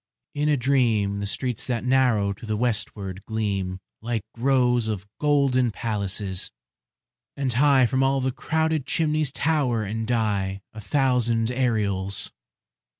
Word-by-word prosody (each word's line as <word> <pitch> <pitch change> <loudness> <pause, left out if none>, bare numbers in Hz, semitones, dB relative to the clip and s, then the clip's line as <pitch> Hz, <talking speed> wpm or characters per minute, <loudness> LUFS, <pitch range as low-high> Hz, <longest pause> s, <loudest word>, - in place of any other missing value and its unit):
In 150 +1 0
a 150 - +3
dream 115 -6 +2
The 100 - -3
streets 125 +2 -1
that 120 -3 -1
narrow 125 -6 +2
to 110 - -11
the 110 -1 -1
westward 100 -4 -1
gleam 100 -4 -2 0.2
Like 115 -2 -2
rows 125 -2 +2
of 100 -3 -3
golden 140 -4 +3
palaces; 100 -4 -3 0.9
and 135 -3 0
high 135 +1 +5
From 130 +2 +1
all 135 0 +2
the 130 0 0
crowded 160 +1 -1
chimneys 155 -3 +1
tower 140 -7 +1
and 110 +2 -3
die 100 -5 -1
A 110 - -8
thousand 120 -1 +1
aureoles. 105 -6 -1
120 Hz, 135 wpm, -24 LUFS, 105-135 Hz, 0.9 s, high